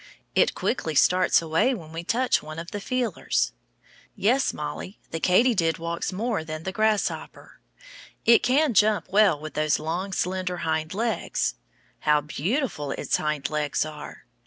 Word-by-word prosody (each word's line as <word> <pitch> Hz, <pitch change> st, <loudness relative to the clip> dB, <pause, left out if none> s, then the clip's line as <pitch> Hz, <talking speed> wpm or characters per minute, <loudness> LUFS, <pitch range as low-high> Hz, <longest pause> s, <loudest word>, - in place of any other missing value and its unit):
It -, -, +3 dB
quickly 160 Hz, -11 st, -2 dB
starts 180 Hz, +2 st, +4 dB
away 165 Hz, +11 st, +2 dB
when 160 Hz, -7 st, -10 dB
we 165 Hz, +1 st, -5 dB
touch 245 Hz, +7 st, +1 dB
one 155 Hz, +1 st, -9 dB
of 170 Hz, +1 st, -7 dB
the 205 Hz, -, -4 dB
feelers. 240 Hz, -, -1 dB, 0.6 s
Yes, 250 Hz, +7 st, +2 dB
Mollie, 165 Hz, +6 st, -6 dB
the 165 Hz, -, -3 dB
katydid 185 Hz, -3 st, +3 dB
walks 170 Hz, +2 st, -3 dB
more 210 Hz, -2 st, -2 dB
than 155 Hz, 0 st, -6 dB
the 190 Hz, -, -3 dB
grasshopper. 215 Hz, 0 st, -1 dB, 0.7 s
It 235 Hz, -, +7 dB
can 275 Hz, +2 st, +2 dB
jump 210 Hz, 0 st, +3 dB
well 200 Hz, -6 st, +4 dB
with 155 Hz, +1 st, -8 dB
those 155 Hz, -1 st, +1 dB
long, 170 Hz, +5 st, -3 dB
slender 185 Hz, -1 st, -2 dB
hind 160 Hz, +2 st, -1 dB
legs. 230 Hz, +1 st, -1 dB, 0.5 s
How 150 Hz, 0 st, +3 dB
beautiful 155 Hz, -, -2 dB
its -, -, 0 dB
hind 150 Hz, -2 st, -2 dB
legs 150 Hz, -1 st, 0 dB
are! 150 Hz, -1 st, -9 dB
180 Hz, 150 wpm, -25 LUFS, 155-215 Hz, 0.7 s, It